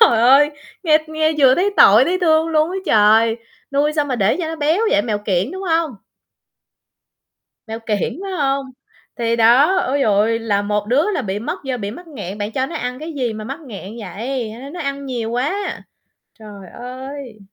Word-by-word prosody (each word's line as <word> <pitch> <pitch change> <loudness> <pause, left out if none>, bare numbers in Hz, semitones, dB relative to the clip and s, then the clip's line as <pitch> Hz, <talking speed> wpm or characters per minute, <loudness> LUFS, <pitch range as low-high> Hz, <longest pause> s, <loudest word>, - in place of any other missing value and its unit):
Trời 230 - +6
ơi, 275 +5 +6 0.3
nghe 310 -3 +4
nghe 315 0 +1
vừa 265 -3 +6
thấy 380 +6 +1
tội, 215 +6 +7
thấy 360 +4 0
thương 320 -2 +3
luôn 315 0 +2
á 375 - -4
trời, 220 +2 +4 0.4
nuôi 290 +2 +2
sao 300 -1 +1
mà 265 -3 -2
để 205 -2 +2
cho 335 - -2
nó 325 - -4
béo 315 +5 +1
vậy? 200 - +3
Mèo 215 -3 -2
kiểng, 200 +1 -1
đúng 380 +1 -6
hông? 325 -6 0 1.7
Mèo 225 +1 -5
kiểng, 225 - -2
phải 390 - -5
hông? 275 -5 0 0.5
Thì 230 -1 0
đó, 245 +11 +5
ôi 280 -3 0
giời - - +4
ơi, 220 +3 +2
là 205 -3 0
một 210 0 -2
đứa 290 - +2
là - - -1
bị 195 0 -3
mất 225 - -4
do 265 -2 -3
bị 205 -3 -4
mắc 350 +10 -11
nghẹn, 205 - -7
bạn 205 +1 -4
cho 260 +2 -1
nó 330 - -8
ăn 250 -3 -4
cái 320 +2 -7
gì 250 -6 -2
mà 215 0 -7
mắc 270 +8 -6
nghẹn 205 -8 -9
vậy? 230 +2 -4
Hay 230 +3 -10
nó 275 - -8
nó 350 +4 -8
ăn 280 -1 -4
nhiều 240 -4 -3
quá. 295 +12 -2 0.6
Trời 205 -4 -11
ơi! 255 -1 -8
255 Hz, 210 wpm, -19 LUFS, 220-305 Hz, 1.7 s, tội